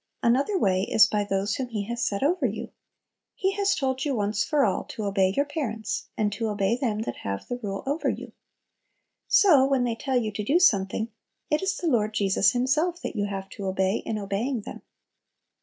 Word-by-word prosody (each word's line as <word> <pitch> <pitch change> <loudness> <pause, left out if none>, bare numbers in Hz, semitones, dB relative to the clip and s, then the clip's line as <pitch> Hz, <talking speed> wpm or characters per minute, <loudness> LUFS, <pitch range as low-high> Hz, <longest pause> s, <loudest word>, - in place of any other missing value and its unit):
Another 275 - +2
way 190 - +2
is 210 +2 +5
by 210 -1 0
those 200 0 -1
whom 260 - -3
He 215 -4 -3
has 235 +3 -3
set 200 +4 -1
over 350 +6 +2
you. - - -6 0.6
He 385 0 +1
has 400 0 +1
told 265 -1 -1
you 285 -3 0
once 205 -1 0
for 295 -4 +2
all 195 - 0
to 220 - -6
"obey 195 -2 +2
your 285 - +3
parents," 230 -8 -3
and 210 -1 0
to 225 +2 -2
"obey 205 +1 +1
them 230 -4 -1
that 120 - -4
have 100 0 -5
the 245 - -4
rule 195 -3 -4
over 285 +4 0
you." - - -5 1.0
So, 315 -10 +6
when 270 -2 +2
they 240 -1 0
tell 260 +2 -1
you 220 -3 0
to 210 +1 -4
do 285 +11 +3
something, 220 - +2 0.4
it 300 - +2
is 385 0 -1
the - - -5
Lord 220 -8 +1
Jesus 195 +1 +3
Himself 300 +8 +1
that - - -4
you 205 -1 0
have 195 -1 -5
to 200 -3 -6
obey 190 +1 +1
in 220 - -3
obeying 215 +5 -2
them. - - -9
225 Hz, 205 wpm, -26 LUFS, 200-275 Hz, 1.0 s, So